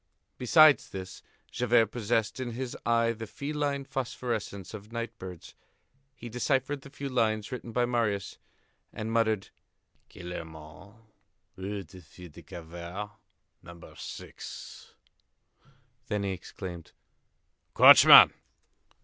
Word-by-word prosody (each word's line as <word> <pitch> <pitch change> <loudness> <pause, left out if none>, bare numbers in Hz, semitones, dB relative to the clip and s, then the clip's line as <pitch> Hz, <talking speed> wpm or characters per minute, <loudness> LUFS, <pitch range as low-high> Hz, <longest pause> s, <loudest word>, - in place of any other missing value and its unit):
Besides 155 +4 +5
this, 95 -1 -8 0.3
Javert 120 -3 +2
possessed 115 0 -1
in 120 -2 -4
his 125 +1 -5
eye 115 0 +3
the 115 0 -8
feline 145 +1 -3
phosphorescence 120 -7 -4
of 105 +1 -10
night 115 0 -5
birds. 90 -3 -10 0.6
He 120 - -9
deciphered 135 +4 -1
the 140 - -12
few 140 0 -6
lines 110 -5 0
written 125 -2 -6
by 120 +2 +1
Marius, 110 -5 -2 0.5
and 110 +1 -5
muttered: 110 -3 +1 0.6
"Gillenormand, 85 +2 -10 0.6
Rue 100 +1 -5
des 90 +2 -14
Filles 85 +1 -14
du - - -13
Calvaire, 85 +5 -8 0.5
No. 85 0 -13
6." - - -10 1.1
Then 105 -3 -2
he 100 - -1
exclaimed: 90 -2 -8 0.8
"Coachman!" - - +10
110 Hz, 110 wpm, -28 LUFS, 95-125 Hz, 1.1 s, Coachman